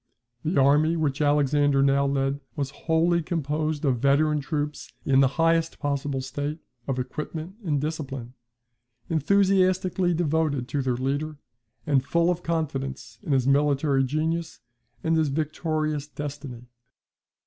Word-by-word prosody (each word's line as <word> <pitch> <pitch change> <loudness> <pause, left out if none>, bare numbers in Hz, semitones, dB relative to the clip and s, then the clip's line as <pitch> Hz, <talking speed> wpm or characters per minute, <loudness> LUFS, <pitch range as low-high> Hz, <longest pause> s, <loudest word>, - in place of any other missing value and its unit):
The 160 0 +1
army 150 +4 +4
which 150 -3 -1
Alexander 145 -1 +3
now 140 0 +3
led 135 0 0 0.2
was 140 -3 -2
wholly 165 +3 +1
composed 155 -1 -2
of 130 -4 +2
veteran 150 +3 +3
troops 150 0 -3
in 135 -1 +4
the 135 - +6
highest 165 0 +2
possible 140 -2 -2
state 145 +4 -4 0.3
of 135 -2 -1
equipment 155 +8 -5
and 150 -6 0
discipline, 135 -5 -4 0.8
enthusiastically 185 +1 +2
devoted 155 -5 0
to 145 - -1
their 130 -2 0
leader, 145 +4 -2 0.5
and 140 -4 +2
full 170 +5 +2
of 175 0 -3
confidence 135 -8 -3
in - - -4
his 130 -3 +3
military 140 0 +3
genius 160 +5 -2 0.4
and 165 0 +2
his 155 -2 +2
victorious 155 0 -2
destiny. 140 -5 -7
150 Hz, 130 wpm, -26 LUFS, 135-160 Hz, 0.8 s, the